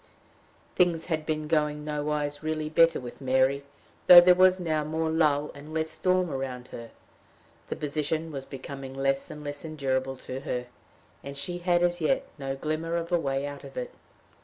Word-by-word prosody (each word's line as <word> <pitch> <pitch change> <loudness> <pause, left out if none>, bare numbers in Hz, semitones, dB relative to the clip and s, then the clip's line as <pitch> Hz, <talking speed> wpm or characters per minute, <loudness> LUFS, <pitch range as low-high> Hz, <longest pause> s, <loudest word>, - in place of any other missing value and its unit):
Things 170 -2 +2
had 155 -3 -2
been 155 -1 -2
going 150 -1 0
nowise 150 -1 -2
really 155 -1 -2
better 165 +1 +4
with 125 +2 -9
Mary, 130 +1 +2 0.4
though 180 -1 +12
there 180 +1 +7
was 185 +1 +5
now 155 -3 0
more 160 +1 -1
lull 150 -2 +2
and 150 +2 -10
less 160 0 -1
storm 185 -2 +1
around 130 -2 -5
her. 115 -1 -8 0.8
The - - -2
position 155 +2 -2
was 135 -2 -5
becoming 135 0 -8
less 135 0 0
and 150 - -8
less 145 0 -6
endurable 135 -4 -2
to 130 +1 -5
her, 125 -2 -3 0.6
and 140 0 -7
she 175 +5 -3
had 175 0 +2
as 175 0 +1
yet 155 - +1
no 135 -1 -3
glimmer 155 +4 -2
of 170 +1 -3
a 175 - +3
way 135 -2 -1
out 145 0 -7
of 135 -1 -11
it. 125 - -4
150 Hz, 180 wpm, -27 LUFS, 135-160 Hz, 0.8 s, though